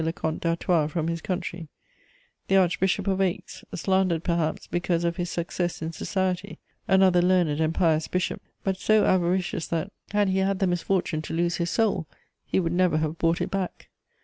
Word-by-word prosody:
le 160 - 0
Comte 160 -3 -3
d'Artois 170 -2 +1
from 165 0 -2
his 165 -1 -3
country; 175 -2 -4 0.8
the 195 - +2
Archbishop 190 +1 +2
of 195 -1 +1
Aix, 185 -2 -2
slandered 185 -2 +1
perhaps 170 -3 -1
because 175 -1 -1
of 170 0 -1
his 175 -1 -2
success 175 0 -2
in 160 0 -4
society; 190 +2 -2 0.3
another 190 -2 +5
learned 175 -4 +2
and 160 +1 +1
pious 160 -3 +2
bishop, 180 0 -2 0.2
but 190 -1 0
so 215 +2 +3
avaricious 180 -2 +1
that, 170 +4 -2 0.2
had 205 0 +2
he 190 0 +1
had 195 0 +1
the 195 - +1
misfortune 175 -2 0
to 155 - -5
lose 170 +1 +1
his 170 -1 -1
soul, 200 -7 +1 0.4
he - - 0
would 170 -2 0
never 180 -3 +3
have 155 +1 -2
bought 165 0 +1
it - - -2
back. 195 -2 -4
175 Hz, 180 wpm, -26 LUFS, 165-190 Hz, 0.8 s, another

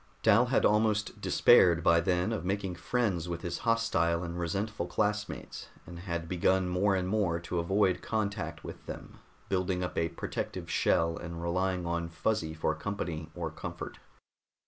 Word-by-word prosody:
Dal 115 +3 +5
had 125 - +2
almost 105 -1 +2
despaired 85 -2 +5
by 85 -1 +5
then 90 +4 +1
of 105 - -3
making 95 0 -1
friends 90 -2 -1
with 85 -1 -4
his 85 -1 -3
hostile 115 -8 +1
and 85 0 -5
resentful 95 +2 -2
classmates 105 +3 -2 0.2
and 85 +1 -9
had 85 -2 -4
begun 95 +1 +2
more 95 +3 +2
and 90 -1 -1
more 95 -4 +1
to 85 +1 -2
avoid 95 +1 +2
contact 100 -7 -2
with - - -9
them, - - -8 0.3
building 90 -1 0
up 90 - -4
a 85 0 +1
protective 85 - -5
shell 80 0 +2
and 85 -1 -6
relying 90 +1 0
on 85 0 -2
Fuzzy 85 -1 -1
for 80 0 0
company 80 -2 -4
or 85 -3 -3
comfort. - - -7
90 Hz, 160 wpm, -30 LUFS, 85-100 Hz, 0.3 s, Dal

